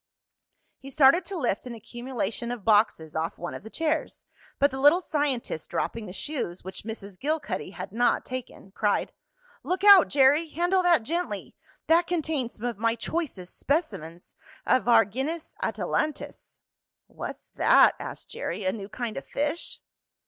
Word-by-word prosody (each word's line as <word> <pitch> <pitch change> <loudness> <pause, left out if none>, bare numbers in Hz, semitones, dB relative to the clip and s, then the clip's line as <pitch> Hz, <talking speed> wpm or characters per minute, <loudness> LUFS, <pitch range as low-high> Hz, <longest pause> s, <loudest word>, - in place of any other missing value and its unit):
He 275 - -10
started 275 +5 +5
to 390 0 -5
lift 245 - -1
an 240 - -6
accumulation 235 0 -4
of 240 -5 -6
boxes 205 -8 +2
off 160 +1 -2
one 175 - -5
of - - -7
the 220 - -10
chairs, 315 +4 -2 0.3
but 280 0 +3
the 265 - -5
little 290 +6 +6
scientist, 285 - -2
dropping 230 -2 -3
the - - -7
shoes, 190 - -5
which 190 +1 -7
Mrs. 205 -3 -8
Gilcuddy 285 -11 -2
had 195 - -7
not 240 +3 +1
taken, 250 -6 -7
cried: 205 +1 0 0.5
"Look 370 +2 -2
out, 400 -4 +9
Jerry! 290 +4 +4
Handle 350 +4 +1
that 345 -9 +4
gently. 340 +8 -3 0.3
That 335 +2 +4
contains 310 -8 -2
some 225 - -7
of 235 -4 -3
my 230 +1 +2
choicest 235 - -4
specimens 180 - -2 0.3
of 255 -1 +2
Argynnis 255 - +2
atalantis." 305 -1 -3 0.5
"What's - - -8
that?" - - +5
asked - - -6
Jerry. 205 - -4
"A 185 - +2
new 200 -2 -7
kind 230 +2 -4
of 275 - -6
fish?" 295 +4 -3
255 Hz, 155 wpm, -27 LUFS, 210-310 Hz, 0.5 s, out